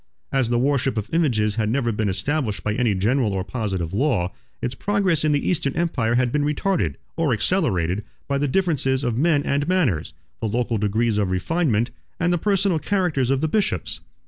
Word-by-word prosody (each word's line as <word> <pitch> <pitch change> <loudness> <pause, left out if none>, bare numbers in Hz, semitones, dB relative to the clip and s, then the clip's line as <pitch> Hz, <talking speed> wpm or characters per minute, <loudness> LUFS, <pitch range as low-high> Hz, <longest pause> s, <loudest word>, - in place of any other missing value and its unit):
As 135 -4 +1
the 120 - +2
worship 135 -1 +1
of 110 +4 -4
images 115 -10 +1
had 110 -2 +1
never 120 -1 +1
been 105 -1 -1
established 125 +2 -1
by 105 - 0
any 115 -3 +1
general 110 +3 +1
or 95 -1 -1
positive 95 -7 -3
law, 105 -7 +1 0.3
its 120 +1 -2
progress 190 -1 +1
in 155 - +3
the 145 -1 0
Eastern 145 -6 0
empire 135 -9 0
had 125 -1 +2
been 150 +1 +1
retarded, 160 +5 0 0.2
or 160 -6 +2
accelerated, 100 - +1 0.2
by 140 0 0
the 145 - +1
differences 140 -5 +1
of 120 -3 0
men 145 +2 +2
and 145 +1 0
manners, 120 - +1 0.3
the 110 - -2
local 115 0 0
degrees 105 +1 +1
of 100 -3 +1
refinement, 120 - 0 0.3
and 175 +1 +2
the 175 - +1
personal 195 -3 +2
characters 175 -10 0
of 135 0 +1
the 160 - +1
bishops. 205 +6 -1
130 Hz, 190 wpm, -23 LUFS, 110-155 Hz, 0.3 s, in